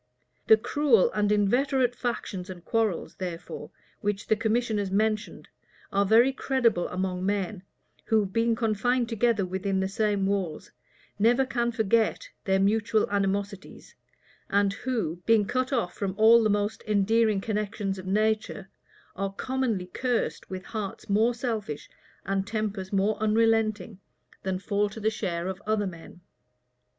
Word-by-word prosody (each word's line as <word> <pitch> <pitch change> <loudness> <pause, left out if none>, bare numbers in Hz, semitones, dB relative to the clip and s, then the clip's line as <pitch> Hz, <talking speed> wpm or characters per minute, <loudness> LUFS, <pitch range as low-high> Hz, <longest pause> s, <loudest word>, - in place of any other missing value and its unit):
The 220 - +8
cruel 240 -2 +3
and 210 -1 +1
inveterate 245 +5 +2
factions 210 -7 -4
and 180 -2 -9
quarrels, 220 -6 -1
therefore, 175 -3 -6 0.3
which 205 -1 -2
the 220 - +5
commissioners 220 -2 0
mentioned, 215 +2 -1 0.5
are 200 0 +2
very 235 +6 +5
credible 240 -9 +1
among 185 0 -3
men, 200 -1 -1 0.4
who, 220 -2 +2
being 230 +4 +1
confined 235 +2 +1
together 230 -3 +1
within 190 +1 -2
the 190 - 0
same 205 0 0
walls, 190 -5 -2 0.5
never 240 +5 +4
can 240 -2 -1
forget 225 - +1 0.2
their 190 -2 +2
mutual 215 +2 +2
animosities, 200 0 -3 0.6
and 200 0 +2
who, 200 -8 -3
being 225 -2 +4
cut 255 +5 -1
off 235 -9 0
from 195 -2 -3
all 225 +2 +7
the 215 - +2
most 205 +1 0
endearing 215 +1 +2
connections 205 -2 -3
of 185 - -9
nature, 215 -1 0 0.4
are 195 +1 -2
commonly 235 -3 -2
cursed 245 +6 -2
with 185 -1 -6
hearts 210 -3 -6
more 225 +4 +3
selfish, 220 - -4 0.3
and 195 0 -1
tempers 210 -3 -3
more 200 +2 +1
unrelenting, 220 -2 +1 0.4
than 190 -1 -2
fall 205 +1 0
to 215 - -9
the 220 +1 +1
share 175 -5 -3
of 190 +1 -4
other 215 -1 +1
men. 175 -1 -9
210 Hz, 140 wpm, -27 LUFS, 195-225 Hz, 0.6 s, The